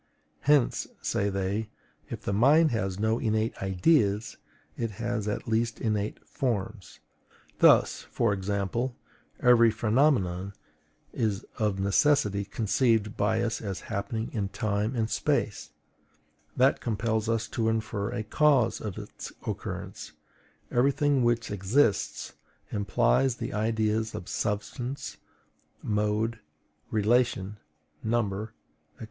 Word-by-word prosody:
Hence, 145 -3 +2 0.2
say 100 - 0
they, 100 +3 -2 0.4
if - - -6
the 100 - -1
mind 145 +9 +5
has 95 -5 -1
no 110 +2 +1
innate 110 0 0
IDEAS, 100 - +2 0.4
it 115 - -2
has 115 0 -3
at 105 +5 -3
least 115 0 0
innate 105 -2 -2
FORMS. 110 - -3 0.6
Thus, - - +5
for 115 -3 +1
example, 100 +5 -2 0.5
every 120 -2 +6
phenomenon 110 -5 +1 0.6
is 110 -2 -1
of 105 -3 0
necessity 100 0 +2
conceived 110 +1 +1
by 110 +3 +1
us 115 -1 -2
as 100 -4 -4
happening 110 +3 -3
in 100 -4 -1
TIME 105 +4 -1
and 110 -2 0
SPACE, 115 -5 -1 0.9
that 130 +2 +4
compels 110 0 -1
us 115 -1 0
to 115 -1 0
infer 110 -2 -2
a 120 -3 -3
CAUSE 130 0 +3
of 105 -4 -5
its - - -8
occurrence; - - -5 0.6
every 125 +3 +3
thing 145 -2 +2
which 120 -2 +1
exists 105 +3 +1 0.4
implies 105 - +2
the - - -5
ideas 110 0 0
of 85 - -7
SUBSTANCE, 120 +5 -3 0.7
MODE, 105 +2 0 0.5
RELATION, 110 -2 +1 0.5
NUMBER, 110 -2 -1 0.4
&C. - - -29
110 Hz, 115 wpm, -28 LUFS, 100-120 Hz, 0.9 s, every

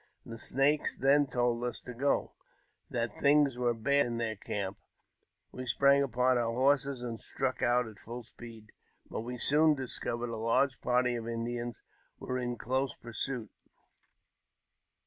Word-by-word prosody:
The 115 -1 -8
Snakes 145 +5 +1
then 140 +2 +4
I - - -4
old 120 -1 +2
us 125 - -3
to 125 - -7
go, 140 +4 0 0.6
that 115 -3 -2
things 145 -2 +4
were 120 -1 +2
bad 140 +4 +2
in 120 -1 -3
their 115 -2 -1
camp. 100 -1 -4 0.7
We 130 0 -7
sprang 140 +4 +4
ipon 125 -1 +2
our 115 -1 0
horses, 135 +1 +2
and 115 -2 -4
struck 135 -1 -3
out 120 0 +3
at 110 -3 -11
full 120 +2 -7
speed; 115 -2 -12 0.4
but - - -3
we 125 +2 -5
soon 150 +3 +3
Uscovered 120 -2 -3
a 115 - -4
large 120 +4 +1
party 125 0 +2
of 115 -1 -6
Indians 120 +1 -4 0.3
were 130 0 -3
in 120 -1 -3
close 130 +2 -1
pursuit. 120 -1 -4
125 Hz, 155 wpm, -31 LUFS, 115-135 Hz, 0.7 s, then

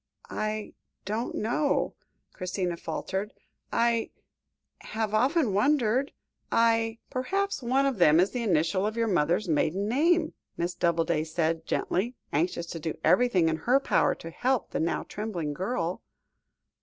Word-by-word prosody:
"I 215 0 -3 0.3
don't 215 +4 -2
know," 260 +7 0 0.4
Christina 180 -1 -2
faltered. 190 +4 -4 0.4
"I 235 -1 +2 0.7
have 220 -1 -3
often 260 - +2
wondered 255 +3 +2 0.4
I 230 0 +3
" - - -45
"Perhaps 390 +9 -1
one 260 +3 +2
of 265 -7 0
them 160 -2 +6
is 185 +3 +3
the 250 - -2
initial 185 -1 +1
of 215 +2 -4
your 230 - +2
mother's 180 +1 +1
maiden 170 +5 +1
name?" 315 +6 +2 0.2
Miss 175 +1 -1
Doubleday 170 -2 +1
said 160 0 -1
gently, 230 +8 -1 0.2
anxious 170 +2 0
to 165 - -5
do 160 0 -4
everything 220 -9 +4
in 160 0 +1
her 245 - +3
power 275 - +2
to 165 - -9
help 255 +6 0
the - - -2
now 165 +1 0
trembling 180 -8 -4
girl. 180 - -2
210 Hz, 145 wpm, -28 LUFS, 170-245 Hz, 0.7 s, them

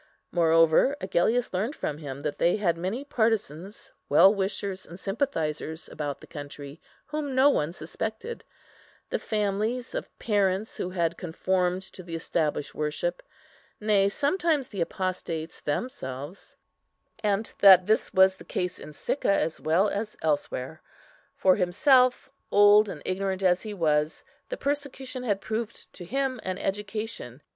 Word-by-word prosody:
Moreover, 165 - +4
Agellius 205 +6 +1
learned 215 +11 -1
from 150 - -3
him 140 -3 -7
that 150 0 -3
they 170 - +3
had 185 -5 +1
many 190 +10 -3
partisans, 215 - -1 0.2
well 190 +7 +7
wishers, 195 -1 -3
and 175 +3 -11
sympathizers, 165 - -2
about 145 -2 -4
the - - -11
country, 145 0 -9 0.2
whom 300 -3 -3
no 270 +2 +6
one 150 - 0
suspected; 220 - -5 0.7
the - - 0
families 215 +4 -1
of - - -4
parents 205 -1 0
who 180 - -2
had 170 -2 -1
conformed 180 +1 0
to 190 - -12
the 170 -2 -7
established 155 -3 -1
worship, 325 - -2 0.6
nay, 205 -2 +3
sometimes 295 - 0
the 195 -4 -4
apostates 170 -2 -3
themselves, 145 - -5 0.6
and 210 +1 -1
that 190 -2 +8
this 215 +2 +1
was 190 0 +5
the - - -12
case 180 -1 -3
in 150 - -10
Sicca 235 - -1
as 165 -5 0
well 170 +6 +3
as 210 +1 -3
elsewhere. 150 -1 -2 0.5
For 185 -1 +4
himself, 250 +8 +4 0.2
old 205 +1 +6
and 150 -6 -7
ignorant 190 0 -2
as 180 -1 +3
he 215 -1 -6
was, 155 -3 +1 0.3
the - - -4
persecution 280 -2 -3
had 205 -5 -1
proved 220 +1 -5
to 175 - -9
him 265 +4 -1
an 185 0 -3
education. 205 - -4
190 Hz, 140 wpm, -27 LUFS, 165-220 Hz, 0.7 s, that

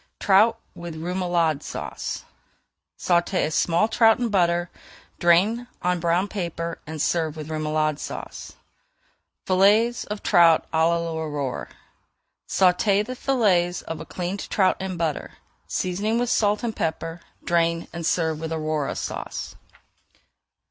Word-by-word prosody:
TROUT 215 +4 +4
WITH 170 -2 -8
REMOULADE 170 -2 0
SAUCE - - -5 0.7
Sauté 175 +1 +1
a 155 - -3
small 170 +6 +2
trout 225 0 +4
in 245 -2 -1
butter, 175 -3 +1 0.5
drain 200 +8 +3 0.2
on 180 0 +1
brown 170 +3 +1
paper, 170 -4 -4
and 160 0 -6
serve 160 0 0
with 155 0 -7
Remoulade 155 -1 0
Sauce. - - -7 0.9
FILLETS 210 +6 +3
OF 210 0 -6
TROUT 165 -2 +5
À 160 0 +3
L'AURORE 160 -5 -2 0.8
Sauté 195 +2 +3
the 255 - -5
fillets 195 -10 +1
of 165 -1 -6
a - - -7
cleaned 185 +2 -4
trout 190 -2 +3
in 190 -2 -4
butter, 160 -3 -2 0.3
seasoning 205 +5 -1
with 245 0 0
salt 210 0 +2
and 230 -2 -2
pepper. 165 +1 -3 0.2
Drain 170 -1 +1
and 170 -1 -5
serve 160 -2 0
with 160 0 -5
Aurora 155 -2 -2
Sauce. - - -5
175 Hz, 125 wpm, -24 LUFS, 160-200 Hz, 0.9 s, TROUT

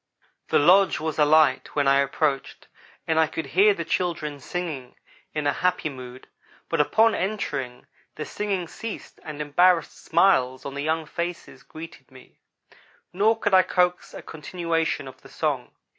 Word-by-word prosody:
The - - +3
lodge 185 +6 +5
was 155 0 -3
alight 150 -2 +3
when 145 -2 +2
I 140 0 +5
approached 140 0 -1 0.4
and 160 0 +1
I 160 - +4
could 160 - -5
hear 195 +9 +4
the 170 - -4
children 155 -6 -2
singing 145 -4 -5 0.4
in 150 -1 -2
a 145 - +2
happy 180 0 0
mood, 130 -2 -10 0.4
but 165 -2 +2
upon 220 +9 +3
entering, 145 -11 -3 0.3
the 150 - -5
singing 195 -4 -3
ceased 225 +5 -8
and 150 -1 -8
embarrassed 165 +3 +2
smiles 130 -9 +2
on 140 - -5
the 140 - -4
young 160 +2 -1
faces 170 +2 -5
greeted 160 -4 -11
me; 130 -1 -18 0.7
nor 215 +5 +3
could 205 -3 -1
I 185 - +8
coax 180 -1 0
a - - -8
continuation 165 -2 -2
of 130 - -12
the - - -15
song. - - -2
160 Hz, 160 wpm, -24 LUFS, 140-180 Hz, 0.7 s, I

